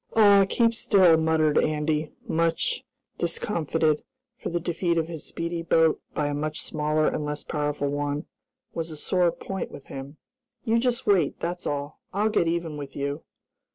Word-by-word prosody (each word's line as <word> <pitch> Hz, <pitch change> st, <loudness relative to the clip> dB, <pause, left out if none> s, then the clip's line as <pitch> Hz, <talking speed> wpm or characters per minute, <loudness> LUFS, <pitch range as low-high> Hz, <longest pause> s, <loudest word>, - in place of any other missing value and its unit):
"Aw, 200 Hz, -3 st, +7 dB
keep 230 Hz, -1 st, +3 dB
still!" 190 Hz, -6 st, +5 dB
muttered 160 Hz, -1 st, +3 dB
Andy, 155 Hz, 0 st, 0 dB, 0.2 s
much 165 Hz, -, 0 dB, 0.4 s
discomfited, 165 Hz, -3 st, 0 dB, 0.3 s
for 260 Hz, -, -5 dB
the 175 Hz, -, -1 dB
defeat 170 Hz, 0 st, 0 dB
of 160 Hz, -1 st, +1 dB
his 165 Hz, -3 st, -7 dB
speedy 170 Hz, 0 st, -3 dB
boat, 165 Hz, -1 st, +3 dB
by 150 Hz, -, 0 dB
a 145 Hz, -, -1 dB
much 155 Hz, +1 st, -2 dB
smaller 155 Hz, 0 st, 0 dB
and 150 Hz, -, 0 dB
less 150 Hz, 0 st, -3 dB
powerful 145 Hz, -1 st, -1 dB
one, 145 Hz, +2 st, -2 dB, 0.5 s
was 165 Hz, 0 st, -3 dB
a 155 Hz, -, -8 dB
sore 175 Hz, +2 st, +2 dB
point 190 Hz, +2 st, -5 dB
with 140 Hz, -, -11 dB
him. 140 Hz, +2 st, -7 dB, 0.5 s
"You 230 Hz, -1 st, +2 dB
just 245 Hz, 0 st, 0 dB
wait, 185 Hz, -8 st, +2 dB
that's 175 Hz, +1 st, -3 dB
all. 145 Hz, +1 st, -3 dB
I'll 210 Hz, +3 st, +2 dB
get 210 Hz, -6 st, +2 dB
even 165 Hz, -2 st, -1 dB
with 140 Hz, -2 st, -8 dB
you!" 140 Hz, +2 st, -3 dB
160 Hz, 165 wpm, -26 LUFS, 150-175 Hz, 0.5 s, Aw